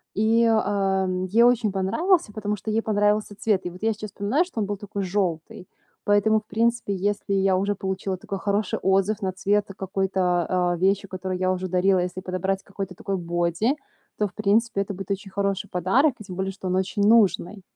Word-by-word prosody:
И, 220 +3 +3
э, - - +4
м, 195 -4 +1
ей 220 +6 +4
очень 240 -3 +3
понравился, 215 - +1
потому 210 -1 -2
что 210 +2 -5
ей 220 +1 +1
понравился 210 -1 +1
цвет. 205 -2 0
И - - -2
вот 180 +3 -12
я 225 0 +2
сейчас 215 0 -7
вспоминаю, 215 - +1
что 355 -10 -7
он 210 - +1
был 205 0 -3
такой 205 0 -5
желтый. 180 -2 -2 0.4
Поэтому, 205 +1 +3
в 210 - -21
принципе, 230 -2 0
если 200 +1 -1
я 195 -1 +3
уже 200 +2 0
получила 190 0 -3
такой 195 +2 -5
хороший 205 0 0
отзыв 195 +2 +1
на 190 -1 -1
цвет 200 +2 0
какой-то, 185 -2 0
э, - - -6
вещи, 195 +2 +2
которую 185 0 -4
я 185 0 +1
уже 185 0 -2
дарила, 185 +1 +2
если 180 +1 -3
подобрать 190 +1 -2
какой-то 195 -2 -6
такой 195 +2 -3
боди, 175 - 0 0.4
то, 210 - +2
в 185 - -16
принципе, 215 +1 +1
это 200 +1 -4
будет 195 0 -8
очень 195 0 -4
хороший 200 0 -1
подарок. 230 - +2
И - - -8
тем 185 -2 -8
более, 190 +1 -2
что 190 -1 -7
он 185 - 0
очень 190 +2 -1
нужный. 205 -3 +3
195 Hz, 205 wpm, -24 LUFS, 185-210 Hz, 0.4 s, э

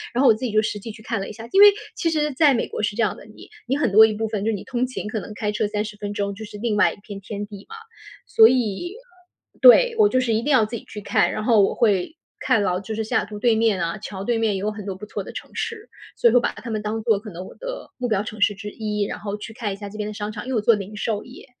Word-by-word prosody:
然 - - +1
后 275 - +5
我 230 - +8
自 215 - -7
己 240 - -2
就 215 +1 +3
实 210 -1 -3
际 225 +3 -7
去 215 0 -14
看 225 -1 -2
了 195 - -5
一 - - -8
下。 225 +2 -10
因 390 - +5
为 415 - +12 0.3
其 330 - 0
实 300 -2 0
在 285 +1 +5
美 235 - -1
国 - - -5
是 205 - -1
这 230 - 0
样 205 - 0
的， - - -13
你 215 - -15 0.2
你 270 +3 +1
很 290 -8 +1
多 215 +3 +8
一 220 - 0
部 220 +1 -2
分 210 -2 -3
就 225 - 0
是 220 - 0
你 195 - -7
通 250 0 -1
勤， 255 - -6
可 215 +1 -3
能 205 - -9
开 210 -1 -2
车 210 0 -1
30 210 0 -3
分 205 -1 -5
钟 200 -1 -2
就 220 - -8
是 210 0 -10
另 220 0 -1
外 210 - +4
一 - - -15
片 205 -2 -8
天 205 +1 -5
地 205 -1 -11
嘛。 455 - -8 0.5
所 220 - +7
以 250 - -1 0.7
对， - - +8
我 420 - +6
就 255 - +2
是 245 -3 0
一 220 - +1
定 290 - -1
要 250 -6 +5
自 220 - -6
己 225 - -7
去 210 - -8
看， - - +2
然 215 - -3
后 220 -2 +5
我 195 - +2
会 210 - +1 0.2
看 215 - +2
到 180 -2 0
就 215 +3 -6
是 220 - -2
西 220 - -6
雅 - - +3
图 210 0 -8
对 235 0 +3
面 220 -3 +2
啊， 170 +4 -2
桥 195 -1 -7
对 240 +3 0
面 220 -3 +1
也 - - -2
有 210 +2 -1
很 210 -1 -8
多 195 -2 -4
不 190 - -9
错 - - -5
的 - - -9
城 - - -9
市， 455 0 -4 0.3
所 - - +3
以 - - 0
会 245 - +7
把 - - -1
它 235 - -8
们 215 -1 -2
当 215 +1 -3
做 220 -3 +2
可 215 +1 -10
能 180 +2 -8
我 - - -11
的 - - -7
目 250 - -2
标 210 -3 0
城 215 -1 -8
市 205 0 +3
之 205 +1 -7
一， 210 -1 -2
然 200 - -4
后 205 0 -4
去 220 +2 -9
看 220 -2 -3
一 - - -6
下 205 0 -8
这 210 - -10
边 210 -1 -3
的 215 - -5
商 210 0 -4
场 210 +1 -7
因 - - -3
为 - - 0
我 220 - +1
做 230 - +5
零 205 +1 -7
售 210 0 -2
业， 250 - -13
215 Hz, 350 characters per minute, -23 LUFS, 205-235 Hz, 0.7 s, 为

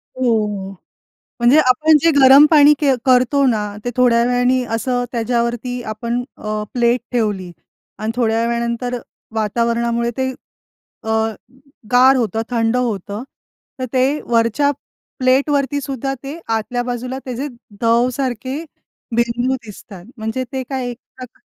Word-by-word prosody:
हो, 260 - -8 0.3
हो. 195 -2 -5 0.7
म्हणजे 240 +5 +5
आपण 305 +4 +5
जे 330 - +5
गरम 275 +1 +8
पाणी 300 -1 +7
के 280 -3 +3
करतो 260 +2 +3
ना, 220 -3 +2 0.3
ते - - 0
थोड्या 235 -2 +4
वेळाने 250 +1 +2
असं 245 +1 -1
त्याच्यावरती 240 +1 -1
आपण 235 +3 -3
अ, 215 0 -3
प्लेट 240 0 +2
ठेवली 205 -7 -1 0.5
आणि 215 +1 -2
थोड्या 230 -1 +1
वेळानंतर 235 +1 -2 0.4
वातावरणामुळे 235 +2 0
ते 260 0 0 0.7
अ, 220 - -5 0.8
गार 260 +2 +6
होतं. 225 -2 -1
थंड 230 +1 +1
होतं. 210 -2 -3 0.6
तर 255 - -2
ते 265 +4 +1
वरच्या 235 +5 +2 0.5
प्लेटवरती 280 +2 +2
सुद्धा 270 -1 -3
ते 290 +5 -6 0.2
आतल्या 245 +3 -2
बाजूला 250 +2 -4
त्याचे 255 +3 -4 0.3
दव 235 +2 +3
सारखे 260 +3 -3 0.5
बिंदू 240 +2 +1
दिसतात. 210 -5 -11
म्हणजे 220 +4 -3
ते 260 -1 -2
काय 260 -2 -3
एक 240 - -7 0.2
प्रकाऱ् 255 -1 -11
245 Hz, 130 wpm, -18 LUFS, 230-260 Hz, 0.8 s, गरम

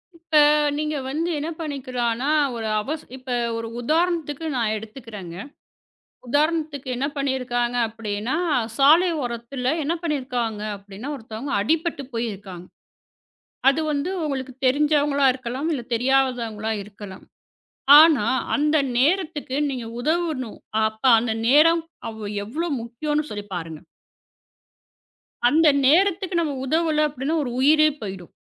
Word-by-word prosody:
இப்ப 330 -1 -5 0.4
நீங்க 305 0 -2
வந்து 320 +5 -1
என்ன 305 +3 -3
பண்ணிக்கலானா 255 -4 -2 0.3
ஒரு 225 -1 -4
அவச 300 +9 -4 0.2
இப்ப 255 0 -8 0.3
ஒரு 230 0 -4
உதாரணத்துக்கு 325 +1 0
நான் 225 -3 0
எடுத்துக்கிறேங்க. 215 -5 -9 0.9
உதாரணத்துக்கு 300 0 0
என்ன 265 +3 -1
பண்ணிருக்காங்க 250 -3 -1
அப்டின்னா 220 +3 -3 0.4
சாலை 315 +6 +6 0.2
ஒரத்துல 245 +2 -3
என்ன 305 +4 0
பண்ணிருக்காங்க 250 -8 -2 0.2
அப்டின்னா 200 +6 -9
ஒருத்தவங்க 230 +4 -6
அடிபட்டுப் 310 - -1
போயிருக்காங்க. 200 -6 -5 1.0
அது 275 +3 +3
வந்து 290 +5 -1
உங்களுக்குத் 265 -2 -5
தெரிஞ்சவங்களா 285 0 +3
இருக்கலாம் 255 +4 -4
இல்ல 270 -5 -2
தெரியாதவங்களா 240 -4 0
இருக்கலாம். 200 -1 -11 0.8
ஆனா 310 -8 +5 0.3
அந்த 300 +1 +2 0.2
நேரத்துக்கு 300 -3 0
நீங்க 255 -4 -4
உதவணும். 310 -4 -2 0.3
அப்ப 220 0 -10 0.2
அந்த 225 -1 -1 0.2
நேரம் 325 +4 +5 0.3
அவ் 220 -1 -8 0.2
எவ்வளோ 310 +11 -3
முக்கியம்னு 295 +6 -3
சொல்லிப் 205 -1 -7
பாருங்க. 165 -3 -6 1.7
அந்த 315 +4 +4 0.2
நேரத்துக்கு 365 +4 +3
நாம 300 -4 -2
உதவல 310 +1 +2
அப்டின்னா 290 +3 -2
ஒரு 250 - -4
உயிரே 305 +3 +5
போய்டும். 190 -4 -7
265 Hz, 110 wpm, -23 LUFS, 230-305 Hz, 1.7 s, சாலை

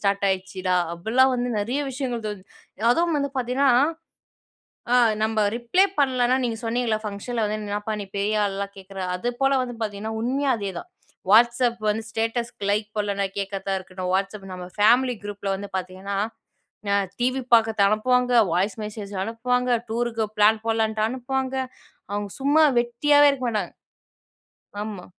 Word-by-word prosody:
Start 200 0 +1
ஆயிடுச்சுடா. 185 -1 -1 0.2
அப்படிலாம் 235 +10 +3
வந்து 245 0 -1
நிறைய 240 +7 -1
விஷயங்கள் 250 -4 -3
தோ 210 - -2 0.6
அதுவும் 335 +5 +2
வந்து 280 -1 -1
பார்த்தீங்கன்னா, 255 +2 +2 1.2
ஆ - - +6 0.3
நம்ம 220 0 -1 0.2
ரிப்ளே 245 +12 +3
பண்ணலனா 255 -2 +3
நீங்க 230 -2 -2
சொன்னிங்கள, 230 -1 0
ஃபங்க்ஷன்ல 215 +3 -3
வந்து 215 +1 -2
என்னப்பா 210 +1 -3
நீ - - -6
பெரிய 210 +1 +1
ஆள்லாம் 200 0 -3
கேட்குற. 195 0 -10 0.2
அது 210 +7 -2
போல 270 0 +4
வந்து 245 -1 -6
பார்த்தீங்கன்னா, 215 +1 -4
உண்மையே 270 +4 0
அதேதான். 200 - -6 0.4
WhatsApp 235 +1 +4
வந்து 220 +2 -1
ஸ்டேட்டஸ்க்கு 225 -2 -2
லைக் 210 +1 0
போடலன்னா, 200 -1 0
கேட்கறதா 195 0 -2
இருக்கணும். 185 -1 -5
WhatsApp 195 +1 -2
நம்ம 180 -1 -7
ஃபேமிலி 245 +4 +4
குரூப்ல 205 -1 -4
வந்து 200 +1 -7
பார்த்தீங்கன்ன 185 +2 -5 0.7
ந 200 - +1 0.3
டிவி 255 +2 +1
பா்குறது 225 -2 +4
அனுப்புவாங்க, 250 +4 +2 0.2
வாய்ஸ் 190 +4 +1
மெசேஜ் 210 -1 -7
அனுப்புவாங்க, 250 +3 -1 0.2
டூருக்கு 230 -1 -1
பிளான் 215 +1 +4
போடலான்ட்டு 220 -1 0
அனுப்புவாங்க, 260 +1 -2 0.6
அவங்க 205 0 -3
சும்மா 295 +3 +4 0.2
வெட்டியாவே 290 +5 +4
இருக்க 265 -2 -4
மாட்டாங்க. 215 -2 -2 1.1
ஆமா. 205 -4 -7
220 Hz, 140 wpm, -24 LUFS, 200-250 Hz, 1.2 s, ஆ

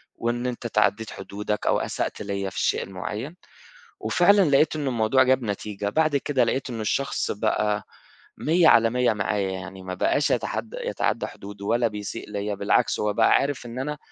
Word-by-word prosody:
وإن 120 +1 -2
أنت 120 -1 -5
اتعدّيت 110 -1 +1
حدودك 105 +2 -4
أو - - +3
أسأت - - -3
ليّا 100 -1 -3
في - - -15
الشيء - - +1
المعيّن 105 - -6 0.6
وفعلًا 200 +3 +4
لقيت 145 +3 +3
إنّه 145 -3 -1
الموضوع 120 +2 +3
جاب 130 0 +2
نتيجة، 105 -1 -3
بعد 155 +6 +2
كده 140 -1 +1
لقيت 135 0 -1
إنّه 115 -3 -4
الشخص 135 +6 -1
بقى 105 -1 0 0.5
مِيّة 165 +2 +3
على 115 -5 +6
مِيّة 125 -1 +2
معايا، 100 -1 -1
يعني 95 0 -7
ما 95 0 -5
باقاش 90 - +1
يتحدّى - - -2
يتعدّى - - -1
حدوده 100 0 -10
ولا 115 +2 +2
بيسيء 105 +1 -6
ليّا 105 0 -2
بالعكس، - - +1
هو 105 0 0
بقى - - +4
عارف 140 -2 +1
إن 120 +1 -6
أنا 150 +2 -3
110 Hz, 175 wpm, -25 LUFS, 100-130 Hz, 0.6 s, على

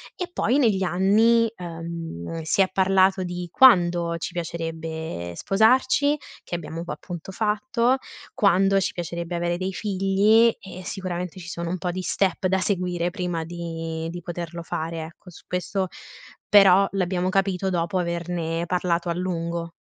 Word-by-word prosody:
E 360 - -4
poi, 255 -4 +1
negli 220 -9 +3
anni, 215 +6 +4
ehm, 165 - -6
si 160 +5 +1
è 190 - +3
parlato 190 0 +3
di 180 0 -5
quando 175 -9 +5
ci 165 - -5
piacerebbe 160 - -5
sposarci- 260 - +3 0.3
che 175 - -5
abbiamo 165 0 -5
poi, 175 - -5
appunto, 175 +1 -8
fatto- 230 +5 +1 0.4
quando 195 0 +3
ci 195 - -1
piacerebbe 170 0 -4
avere 175 0 -1
dei 190 +1 -2
figli 205 +4 +3
e 185 -1 -10
sicuramente, 180 -1 -5
ci 170 - -10
sono 170 -1 -4
un 185 - -2
po' 180 0 -2
di 185 +1 -4
step 190 +1 0
da 190 +1 +2
seguire, 180 -2 -1
prima 175 -3 -3
di 165 -1 -5
di 175 +1 -6
poterlo 170 0 -6
fare, 165 0 -4
ecco. 165 +3 -12
Su 175 - -14
questo 180 +1 -2 0.6
però, 195 -1 +7
l'abbiamo 185 -1 0
capito 195 -1 0
dopo 175 +1 0
averne 170 -1 -2
parlato 175 -1 0
a - - +1
lungo. 170 -1 -3
180 Hz, 150 wpm, -24 LUFS, 170-195 Hz, 0.6 s, però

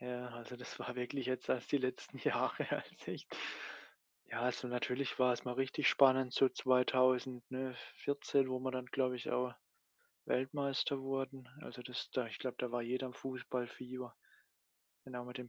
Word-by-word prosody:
ja, 125 0 -4
also, 120 +1 -8
das 125 - -8
war 125 - -4
wirklich 125 +1 -2
jetzt 130 0 -1
erst 125 - 0
die - - +7
letzten 130 -1 -3
Jahre, - - +1
als - - -4
ich - - -4 1.0
ja, 115 - -3
also, 125 +1 0
natürlich 125 +2 -1
war's 125 -1 +4
mal 125 -1 -2
richtig 135 +2 +2
spannend 130 -2 +6
so 135 - +6
2000, 130 -1 +3
ne, 130 0 -2 0.2
14, 140 -1 +2
wo 130 -1 -1
wir 130 0 0
dann, 130 -1 -3
glaube 130 -1 +1
ich, 120 - -5
auch 125 0 +1 0.7
Weltmeister 140 +2 +1
wurden. 135 -1 -3
Also, 125 - -8
das 125 -1 -4
da 125 -2 0
ich 110 - -7
glaube, 130 -2 -3
da 125 -1 -1
war 120 - 0
jeder 130 +2 -1
im 125 - -8
Fußballfieber, 130 -1 -4 0.9
dann 130 -2 -7
auch 125 - -4
mit 125 +1 -7
dem 125 -1 -6
130 Hz, 175 wpm, -37 LUFS, 125-130 Hz, 1.0 s, die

